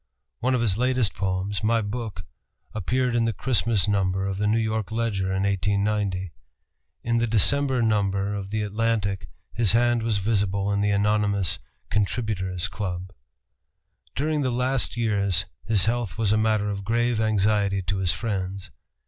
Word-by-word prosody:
One 130 +2 +1
of 125 - 0
his 105 -3 +1
latest 125 -4 +2
poems, 95 +1 -2
"My 115 +1 +3
Book," 110 0 -5 0.5
appeared 125 +5 0
in 115 -1 +2
the 115 - 0
Christmas 110 -2 +1
number 95 -2 +1
of 95 0 -3
the 105 - +1
New 110 +2 +3
York 110 -3 -1
Ledger 110 -4 -1
in 95 +1 0
1890. 100 -1 0 0.7
In 115 0 +1
the 120 - +1
December 130 +4 +3
number 100 -2 +1
of 100 -1 -5
the 110 +1 -1
Atlantic 105 -2 -1 0.3
his 110 -4 +2
hand 120 0 +3
was 110 -2 0
visible 100 -1 0
in 100 - +1
the 105 - +2
anonymous 100 -2 +1 0.3
"Contributor's 100 -4 -1
Club." 95 -2 -5 1.0
During 150 +2 0
the 130 - +1
last 125 0 0
years 100 -5 +1 0.2
his 105 -4 +2
health 115 -2 -1
was 110 -3 +2
a - - +4
matter 110 -1 +1
of 100 -1 -4
grave 115 +1 +1
anxiety 105 -2 +1
to 95 +3 -2
his 95 -2 +2
friends. 95 -1 -4
105 Hz, 155 wpm, -25 LUFS, 100-115 Hz, 1.0 s, a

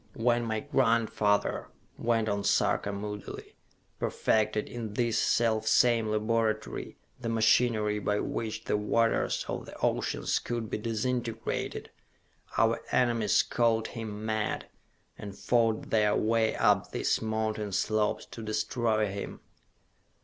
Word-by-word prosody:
"When 120 0 +1
my 110 -1 -1
grandfather," 110 -3 +1 0.3
went 115 -1 0
on 100 -1 -1
Sarka 100 - +2
moodily, 105 0 -7 0.4
"perfected, 110 -1 +1
in 110 -3 -6
this 120 -1 +1
self 110 -2 +2
same 115 0 +4
laboratory, 110 0 -1 0.2
the 120 -2 -3
machinery 110 -1 +3
by 105 +1 0
which 110 -2 -3
the - - 0
waters 115 +2 +1
of - - -4
the - - -10
oceans - - 0
could 120 -2 -4
be - - -2
disintegrated, 115 +1 -3 0.7
our - - +3
enemies 120 -4 +3
called 115 -2 +1
him 110 -2 -6
mad, 110 -1 -1 0.5
and 100 -2 -8
fought 115 -2 +1
their 105 -2 +3
way 110 0 +2
up - - +3
these - - 0
mountain 110 -1 -2
slopes 110 +2 0
to 115 - -8
destroy 110 0 0
him! 100 0 -5
110 Hz, 120 wpm, -29 LUFS, 105-115 Hz, 0.7 s, same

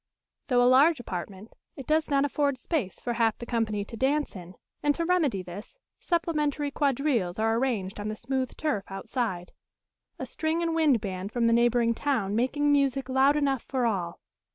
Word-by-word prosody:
Though 245 -2 +3
a - - +4
large 280 +4 +5
apartment, 195 0 -7 0.2
it 270 - -8
does 310 +2 +1
not 280 -1 +3
afford 285 -1 0
space 250 - -3
for 240 - -3
half 230 -1 +1
the 240 - -7
company 220 -4 -1
to 230 - -9
dance 280 +4 0
in; 180 0 -10 0.3
and 290 -1 +2
to 335 - -1
remedy 310 - +1
this, 190 - -10 0.2
supplementary 300 -4 -1
quadrilles 275 - 0
are 225 +1 +1
arranged 220 -7 -2
on 205 - -4
the 215 - -3
smooth 260 +2 -3
turf 235 -11 -1
outside 195 -2 -3 0.7
a - - -5
string 320 +2 -2
and 330 -1 0
wind 300 -8 +3
band 190 -1 -5
from 235 0 0
the 230 - +4
neighbouring 235 0 +3
town 225 -6 -1
making 290 +5 +1
music 275 -2 +1
loud 265 +2 +4
enough 275 -4 +1
for 260 -3 -2
all. 180 -7 -2
250 Hz, 180 wpm, -27 LUFS, 215-290 Hz, 0.7 s, large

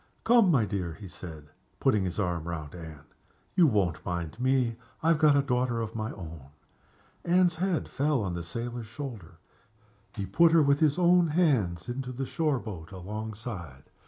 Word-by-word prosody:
"Come, 230 -4 +5
my 130 -10 +4
dear," 95 -5 -3
he 100 +1 -10
said, 80 -5 -10 0.3
putting 100 -3 +2
his 90 - -4
arm 85 -4 -1
round 80 -4 -5
Anne; 80 -4 -10 0.5
"you 175 -4 +6
won't 95 - +1
mind 85 0 -4
me! 125 -3 +1 0.3
I 165 - +3
have 165 -2 +4
got 150 -2 +5
a 140 - +3
daughter 125 -3 0
of 115 -1 -3
my 110 -1 -3
own." 80 -7 -9 0.8
Anne's 175 -1 +3
head 180 -2 0
fell 140 -4 0
on 95 -3 -2
the 85 - -3
sailor's 115 +7 -5
shoulder. 110 - -8 0.8
He 100 -3 -3
put 160 - +4
her, 165 -2 +6
with 140 0 +3
his 155 -1 +3
own 175 -1 +5
hands, 135 - +1
into 125 +1 -4
the 135 +2 -3
shore 150 0 0
boat 95 -8 -8
alongside. 100 - -7
115 Hz, 175 wpm, -28 LUFS, 90-145 Hz, 0.8 s, you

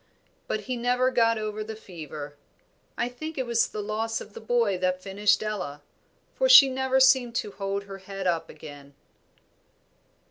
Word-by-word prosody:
But 215 - -2
he 250 +4 -4
never 250 +2 +1
got 230 -2 +3
over 215 0 -4
the 220 +1 -7
fever. 155 -7 -9 0.6
I 235 - 0
think 310 +6 -7
it 260 - -1
was 235 -1 +2
the 210 - -6
loss 220 +2 -2
of 210 - -11
the - - -8
boy 225 -4 +1
that 185 0 0
finished 200 +2 +1
Ella, 180 -9 -5 0.5
for - - +1
she 280 - +9
never 265 0 +1
seemed 260 -3 +4
to 210 - -2
hold 195 0 -3
up - - -21
her 195 -1 -8
head 195 0 -7 0.2
again." 145 -2 -12
215 Hz, 170 wpm, -26 LUFS, 195-245 Hz, 0.6 s, she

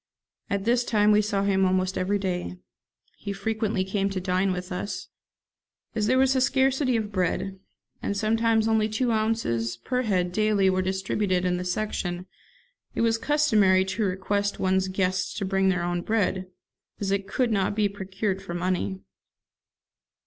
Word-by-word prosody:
At 200 -1 -1
this 240 +1 +3
time 210 -3 +3
we 210 0 +5
saw 200 -2 -1
him 195 -1 +2
almost 185 0 +1
every 195 +3 0
day. 180 - -3 0.6
He 200 -1 -4
frequently 215 0 -1
came 195 +1 -1
to 195 -1 -3
dine 185 +1 +1
with 180 0 -5
us. 180 +3 -4 0.8
As 215 -3 0
there 255 +3 +3
was 265 0 +4
a 260 - +2
scarcity 265 0 +2
of 215 -2 -2
bread, 190 +1 -1 0.4
and 200 - -2
sometimes 225 +1 +2
only 220 -1 +2
two 235 +3 0
ounces 215 - 0
per 250 - -1
head 185 -6 0
daily 205 -1 +2
were 185 0 +1
distributed 190 0 0
in 180 0 +1
the 180 - -3
section, 180 -2 -2 0.7
it - - 0
was 225 -1 +2
customary 215 -11 +3
to 190 +4 -2
request 200 +1 -1
one's 190 0 +1
guests 185 -1 -1
to 200 - -2
bring 195 0 +2
their 180 -2 0
own 175 0 -1
bread, 190 -2 0 0.5
as 195 -1 -2
it 200 0 -1
could 250 +1 0
not 200 -1 +1
be 210 -1 +2
procured 195 0 -3
for 175 -3 -6
money. 175 - -1
195 Hz, 165 wpm, -26 LUFS, 185-215 Hz, 0.8 s, we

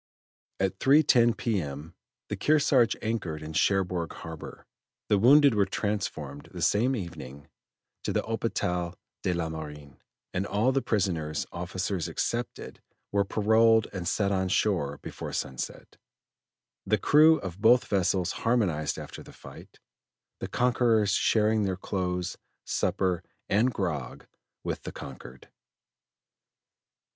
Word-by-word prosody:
At 95 0 -1
3.10 130 -5 +5
P.M. 80 - -3 0.3
the - - -3
Kearsarge 140 -6 +3
anchored 95 -9 -3
in 80 +1 -7
Cherbourg 90 -1 +1
harbor; 80 -1 -9 0.4
the 105 - +4
wounded 140 +4 +6
were 100 -2 +2
transferred 85 -9 -3
the - - -5
same 120 +6 +2
evening 75 - -8 0.6
to - - 0
the - - 0
Hôpital 90 -6 -2 0.3
de 90 - 0
la 85 -1 -1
Marine, 75 -3 -9 0.3
and 95 +3 -1
all 110 +6 +2
the 135 0 +1
prisoners, 85 - -1
officers 90 0 -3
excepted, 120 +1 -4 0.3
were 100 0 +2
paroled 110 +2 +3
and 90 -3 -4
set 100 +2 +1
on 95 -1 +1
shore 90 -7 0
before - - -7
sunset. 65 -1 -5 0.9
The - - +2
crew 155 +2 +6
of 95 0 -7
both 120 +3 +5
vessels 95 -2 +1
harmonized 95 -11 0
after - - -8
the - - -13
fight, - - -13 0.6
the - - -4
conquerors 120 -4 +2
sharing 110 0 +2
their 95 -3 -1
clothes, 90 -2 -3 0.3
supper, 90 -1 0 0.3
and 115 +6 +3
grog 80 - -4 0.4
with - - -3
the - - -7
conquered. 65 -1 -11
95 Hz, 125 wpm, -28 LUFS, 85-115 Hz, 0.9 s, wounded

